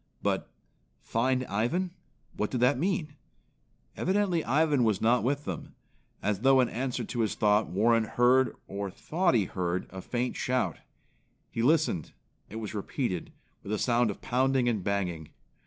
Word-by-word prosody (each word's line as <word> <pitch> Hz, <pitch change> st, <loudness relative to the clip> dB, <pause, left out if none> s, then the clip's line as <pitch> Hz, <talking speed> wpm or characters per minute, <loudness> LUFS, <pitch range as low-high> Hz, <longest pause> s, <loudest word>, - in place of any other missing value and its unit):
But -, -, 0 dB, 0.5 s
"Find 130 Hz, +2 st, 0 dB
Ivan." 120 Hz, -, -1 dB, 0.4 s
What 105 Hz, -, -1 dB
did 125 Hz, -, -2 dB
that 125 Hz, +1 st, +4 dB
mean? 160 Hz, -4 st, -1 dB, 0.8 s
Evidently 185 Hz, -3 st, +1 dB
Ivan 145 Hz, 0 st, +2 dB
was 110 Hz, -4 st, +2 dB
not 120 Hz, +2 st, +3 dB
with 140 Hz, +4 st, 0 dB
them. -, -, -6 dB, 0.5 s
As 105 Hz, -2 st, 0 dB
though 135 Hz, +3 st, +5 dB
in 125 Hz, -, +3 dB
answer 125 Hz, 0 st, -2 dB
to 120 Hz, -, -5 dB
his 110 Hz, -3 st, +1 dB
thought, 105 Hz, +1 st, +3 dB
Warren 115 Hz, +4 st, +3 dB
heard 125 Hz, +3 st, +3 dB
or 100 Hz, 0 st, -4 dB
thought 170 Hz, -, 0 dB
he 105 Hz, -4 st, +3 dB
heard 90 Hz, 0 st, -2 dB
a 95 Hz, 0 st, -7 dB
faint 125 Hz, +5 st, -2 dB
shout. 125 Hz, -, -1 dB, 0.7 s
He 115 Hz, -, -2 dB
listened. 140 Hz, -, +2 dB, 0.4 s
It -, -, -9 dB
was 110 Hz, -2 st, -5 dB
repeated, 105 Hz, -, -3 dB, 0.3 s
with 100 Hz, -, -7 dB
a 110 Hz, -, +1 dB
sound 120 Hz, +1 st, +2 dB
of 100 Hz, -, -6 dB
pounding 130 Hz, 0 st, +1 dB
and 110 Hz, -6 st, 0 dB
banging. 90 Hz, -6 st, -2 dB
120 Hz, 155 wpm, -29 LUFS, 105-135 Hz, 0.8 s, though